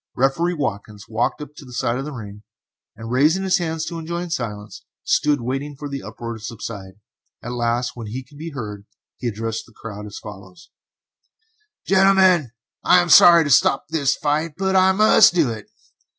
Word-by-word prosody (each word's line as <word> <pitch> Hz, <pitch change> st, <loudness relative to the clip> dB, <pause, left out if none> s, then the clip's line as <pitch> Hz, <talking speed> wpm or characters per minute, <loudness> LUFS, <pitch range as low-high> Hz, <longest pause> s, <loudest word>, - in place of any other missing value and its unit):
Referee 150 Hz, +7 st, +1 dB
Watkins 105 Hz, -7 st, -5 dB
walked 115 Hz, +1 st, -1 dB
to 150 Hz, +1 st, -15 dB
the 125 Hz, -2 st, -13 dB
side 120 Hz, +1 st, -1 dB
of 135 Hz, -, -4 dB
the 150 Hz, -, -6 dB
ring, 105 Hz, -5 st, -9 dB, 0.5 s
and 115 Hz, +1 st, -8 dB
raising 155 Hz, +9 st, +2 dB
his 190 Hz, 0 st, +2 dB
hand 160 Hz, -2 st, -3 dB
to 165 Hz, +1 st, -5 dB
enjoin 170 Hz, +1 st, -5 dB
silence, 105 Hz, -8 st, -5 dB, 0.2 s
stood 145 Hz, -3 st, +1 dB
waiting 135 Hz, +4 st, -4 dB
for 145 Hz, -, -6 dB
the 140 Hz, -1 st, -5 dB
uproar 115 Hz, +2 st, -7 dB
to 110 Hz, -, -9 dB
subside. 105 Hz, -4 st, -7 dB, 0.5 s
At 120 Hz, -, -5 dB
last, 120 Hz, 0 st, -1 dB
when 115 Hz, -3 st, -8 dB
he 125 Hz, +5 st, -6 dB
could 145 Hz, +3 st, -18 dB
be 165 Hz, +2 st, -6 dB
heard, 105 Hz, -8 st, -8 dB, 0.3 s
he 125 Hz, -, -3 dB
addressed 115 Hz, 0 st, -4 dB
the 120 Hz, -, -20 dB
crowd 105 Hz, -1 st, -8 dB
as 105 Hz, -, -9 dB
follows: 95 Hz, -3 st, -12 dB, 1.1 s
"Gentlemen, 190 Hz, -6 st, +4 dB, 0.3 s
I 180 Hz, -, +6 dB
am 175 Hz, -1 st, 0 dB
sorry 170 Hz, +1 st, +8 dB
to 145 Hz, -, -2 dB
stop 135 Hz, +1 st, +3 dB
this 145 Hz, -4 st, +1 dB
fight, 155 Hz, +1 st, -1 dB
but 190 Hz, 0 st, 0 dB
I 190 Hz, 0 st, +5 dB
must 215 Hz, -1 st, +5 dB
do 155 Hz, -9 st, +2 dB
it. 110 Hz, -2 st, -9 dB
135 Hz, 180 wpm, -21 LUFS, 115-165 Hz, 1.1 s, sorry